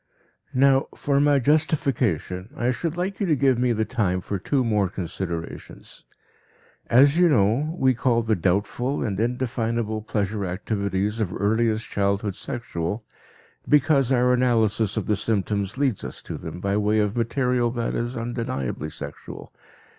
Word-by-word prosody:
Now, 135 +1 +4
for 140 -1 +1
my 145 0 +4
justification, 125 - 0
I 120 +1 +1
should 165 +6 -3
like 190 +2 -2
you 200 - 0
to 155 - +3
give 130 -3 +2
me 125 0 +2
the 110 -1 0
time 95 -4 0
for 95 +2 -4
two 130 +8 0
more 105 -5 +1
considerations. 85 -2 -6 0.8
As 140 +6 +5
you 180 -1 +6
know, 130 - +2
we 130 -4 +3
call 120 -1 +1
the 110 -1 +1
doubtful 100 - 0
and 100 -4 -2
indefinable 115 -2 -1
pleasure 105 -1 -2
activities 100 +2 -2
of 105 -5 -1
earliest 110 +2 0
childhood 100 0 0
sexual 110 -5 -4 0.7
because 140 -2 +4
our 125 -1 +4
analysis 115 -4 +2
of - - -1
the 105 - +1
symptoms 100 0 -1
leads 135 -7 0
us - - -7
to - - -6
them 90 - -7
by 100 +2 0
way 105 +1 +2
of 105 0 +1
material 120 +1 +1
that 120 -1 -2
is 120 +2 -3
undeniably 115 - -3
sexual. - - -9
115 Hz, 150 wpm, -24 LUFS, 100-130 Hz, 0.8 s, you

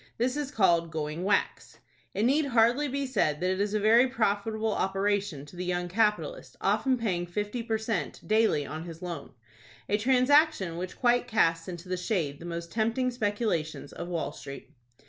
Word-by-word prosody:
This 250 +3 0
is 295 -2 -2
called 175 - +3
"going 155 +1 -4
whacks." 200 +1 0 0.4
It 205 - 0
need 285 +5 +3
hardly 245 +3 +3
be 280 +1 -2
said 155 - 0
that 180 +1 +1
it 190 +1 -1
is 205 +1 0
a - - +2
very 230 +5 +5
profitable 220 -2 0
operation 195 -5 -1
to 145 - -14
the 180 - -4
young 180 0 -1
capitalist, 215 - 0
often 260 -2 +2
paying 180 -7 -1
fifty 210 +6 -3
per 225 -1 -1
cent. 220 -3 -3
daily 215 -9 +3
on 155 +4 -6
his 165 +1 -9
loan,—a 125 - -6
transaction 255 - +3
which 180 +1 -5
quite 245 0 +2
casts 165 -7 +2
into 175 0 -7
the 185 0 -2
shade 175 -7 -2
the 170 - -9
most 170 0 -5
tempting 230 +3 0
speculations 205 - -2
of 175 - -6
Wall 170 -2 -2
Street. 140 -1 -10
205 Hz, 175 wpm, -28 LUFS, 170-235 Hz, 0.4 s, very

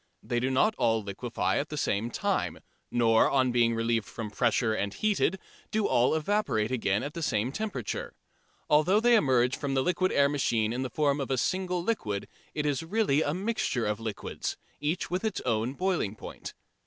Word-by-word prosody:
They 120 - -1
do 130 +2 0
not 135 +12 +3
all 115 -2 +2
liquefy 100 +4 -2
at 145 - -3
the 150 - -5
same 115 -4 0
time, - - -1 0.3
nor 115 -2 +4
on 130 -2 +2
being 120 -1 +3
relieved 115 -1 0
from 115 -2 -6
the 105 - -21
pressure 115 -1 +2
and 100 -2 -1
heated 200 - +1 0.3
do 215 -1 0
all 120 +5 +3
evaporate 160 - 0
again 105 -5 0
at 145 - -5
the 170 - -5
same 115 -4 0
temperature. 145 - -4 0.5
Although 155 +7 +4
they 240 +2 +4
emerge 130 - +3
from 140 -2 -3
the 130 - +2
liquid 185 +3 +1
air 140 0 +4
machine 120 -6 0
in 125 - -2
the 130 - -2
form 145 +2 +1
of 135 - -4
a 135 - +1
single 180 +5 -1
liquid, 105 - -2 0.3
it 150 -1 -1
is 145 -1 0
really 165 -4 +1
a 145 0 0
mixture 190 - -1
of 105 0 -1
liquids, 110 -2 -4 0.2
each 155 +5 -2
with 180 +3 -1
its 220 -3 -1
own 115 +1 0
boiling 175 - -1
point. - - -9
135 Hz, 190 wpm, -28 LUFS, 115-175 Hz, 0.5 s, nor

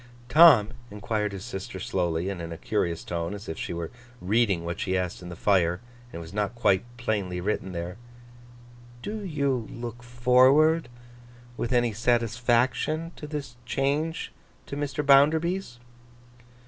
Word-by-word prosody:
'Tom,' 130 -7 +7 0.2
enquired 105 0 -2
his 100 -1 -7
sister, 95 0 -6
slowly, 90 -5 -1
and 95 -3 -4
in 85 0 -6
a 85 - -6
curious 85 -3 -1
tone, 85 +2 -3
as 100 +2 -10
if 80 - -4
she - - -5
were 85 -1 -4 0.3
reading 100 -3 +1
what 85 +3 -4
she 95 0 0
asked 90 -1 -3
in 90 - -8
the 85 - -7
fire, 90 -2 +2 0.3
and - - -11
it - - -4
was 85 +1 -9
not 105 +3 -1
quite 100 -5 +2
plainly 100 -6 -2
written 95 0 -2
there, 85 +2 -5 1.1
'do 210 0 -4
you 140 - -1
look 120 0 -7
forward 130 +6 +4 0.7
with 120 - -3
any 120 -2 +2
satisfaction 120 +7 +1
to 150 - -8
this 145 -4 -6
change 145 +6 -1 0.3
to - - -6
Mr. 145 0 -3
Bounderby's? 155 +2 +3
115 Hz, 150 wpm, -26 LUFS, 95-140 Hz, 1.1 s, Tom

